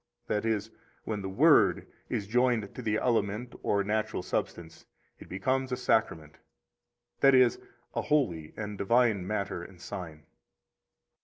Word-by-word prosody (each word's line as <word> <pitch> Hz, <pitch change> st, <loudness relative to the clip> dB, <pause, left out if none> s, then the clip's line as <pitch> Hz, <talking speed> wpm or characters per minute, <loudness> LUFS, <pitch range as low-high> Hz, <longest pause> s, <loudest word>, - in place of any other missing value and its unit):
That 105 Hz, +1 st, -1 dB
is, 110 Hz, 0 st, -1 dB, 0.3 s
when 105 Hz, -2 st, -3 dB
the 95 Hz, -, -4 dB
Word 95 Hz, -, +4 dB, 0.2 s
is 100 Hz, -, -2 dB
joined 120 Hz, -1 st, +1 dB
to -, -, -7 dB
the 110 Hz, -1 st, 0 dB
element 115 Hz, 0 st, 0 dB
or 100 Hz, -1 st, +1 dB
natural 110 Hz, -1 st, -1 dB
substance, 85 Hz, -2 st, -4 dB, 0.3 s
it -, -, -13 dB
becomes 130 Hz, +7 st, -1 dB
a 125 Hz, -, -1 dB
Sacrament, 95 Hz, -, 0 dB, 0.8 s
that 135 Hz, -1 st, +6 dB
is, 125 Hz, -2 st, +4 dB, 0.3 s
a -, -, -1 dB
holy 90 Hz, -, 0 dB
and 105 Hz, -2 st, -5 dB
divine 110 Hz, -3 st, +2 dB
matter 100 Hz, -3 st, -2 dB
and 90 Hz, +1 st, -12 dB
sign. 80 Hz, -4 st, -8 dB
105 Hz, 140 wpm, -29 LUFS, 95-120 Hz, 0.8 s, that